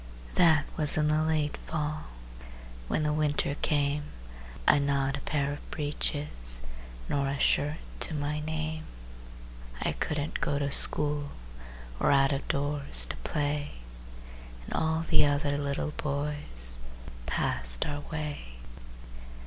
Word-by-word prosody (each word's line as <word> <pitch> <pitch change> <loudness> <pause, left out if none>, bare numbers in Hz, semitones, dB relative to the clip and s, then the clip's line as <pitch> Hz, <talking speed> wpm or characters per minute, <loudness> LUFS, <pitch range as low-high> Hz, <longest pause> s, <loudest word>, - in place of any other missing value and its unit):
That 160 -4 +5
was 150 -1 +6
in 150 -1 +2
the 155 0 +2
late 155 -2 0
fall. 155 -1 -4 0.8
When 155 - 0
the 150 0 +1
winter 150 -2 0
came, 145 0 +1 0.6
I'd 145 - +5
not 140 -1 0
a 140 - -6
pair 145 -1 -1
of 145 - -10
breeches 145 - -3 0.4
Nor 140 -1 0
a 140 +1 -2
shirt 150 +2 +2 0.2
to 160 - 0
my 150 +1 -2
name. 155 0 -4 0.9
I - - 0
couldn't 150 - -3
go 140 - 0
to 140 -1 -1
school, 145 0 +7 0.7
Or - - +2
out 135 0 +4
of 140 0 -3
doors 140 - 0
to - - -7
play. 145 - -2 0.9
And - - -7
all 160 +1 0
the 155 - +5
other 145 0 +1
little 145 +1 -2
boys 140 - -3 0.5
Passed - - -1
our 145 0 -3
way. 150 - -5
145 Hz, 130 wpm, -29 LUFS, 140-150 Hz, 0.9 s, school